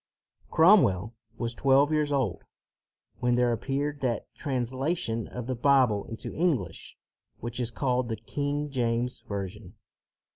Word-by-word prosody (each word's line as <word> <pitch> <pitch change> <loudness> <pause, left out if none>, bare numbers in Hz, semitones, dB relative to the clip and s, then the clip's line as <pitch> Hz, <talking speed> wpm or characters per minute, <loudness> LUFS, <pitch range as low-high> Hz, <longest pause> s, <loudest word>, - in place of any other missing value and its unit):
Cromwell 120 - +5 0.2
was 120 0 -2
twelve 140 +4 +4
years 150 -1 +1
old 130 -11 0 0.8
when 125 0 +2
there 125 0 +3
appeared 140 +4 -2
that 120 -5 -2
translation 130 - -2
of 125 -2 -6
the 130 - -2
Bible 125 -5 +3
into 115 - -7
English 135 - -1 0.4
which 120 +2 -5
is 120 -2 -1
called 125 0 0
the 110 - -1
King 145 +6 -3
James 120 -1 -1
Version. 100 0 -5
125 Hz, 125 wpm, -28 LUFS, 115-140 Hz, 0.8 s, Cromwell